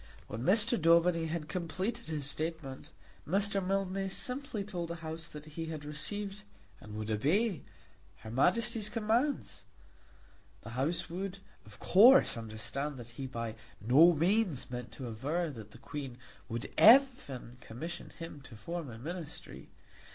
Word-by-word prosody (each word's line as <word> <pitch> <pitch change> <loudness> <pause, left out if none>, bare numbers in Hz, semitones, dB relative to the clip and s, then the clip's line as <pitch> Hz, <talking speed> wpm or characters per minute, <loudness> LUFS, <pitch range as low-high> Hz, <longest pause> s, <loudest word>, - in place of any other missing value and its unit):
When 110 +2 -5
Mr. 210 - +5
Daubeny 170 0 +4
had 160 -1 -3
completed 185 +7 -3
his 155 -3 -3
statement, 155 -2 -4 0.4
Mr. 195 +3 +1
Mildmay 195 0 -1
simply 250 +2 -3
told 180 -4 -4
the 170 - -3
House 160 +1 -5
that 150 -2 -10
he 160 +2 -6
had 155 -2 -6
received 195 +7 -3 0.4
and 105 0 -10
would 110 0 -3
obey 170 - +1 0.6
her 110 +1 -8
Majesty's 215 - +2
commands. 230 +6 0 1.0
The 115 - -8
House 135 +8 -1
would 190 +3 -4 0.3
of 105 -2 -14
course 250 +8 +7
understand 115 +6 -4
that 120 -1 -9
he 130 +3 -6
by 115 -3 -4 0.3
no 145 - +6
means 170 - +1
meant 125 -1 -5
to 130 - -6
aver 150 +9 -2
that 110 -5 -10
the - - -14
Queen 135 -1 -7 0.3
would 115 0 -4
even 220 - +5
commission 155 +11 -7
him 165 -3 -9
to 130 -3 -12
form 165 +7 -5
a 115 - -8
Ministry. 160 +5 -7
165 Hz, 145 wpm, -32 LUFS, 130-195 Hz, 1.0 s, course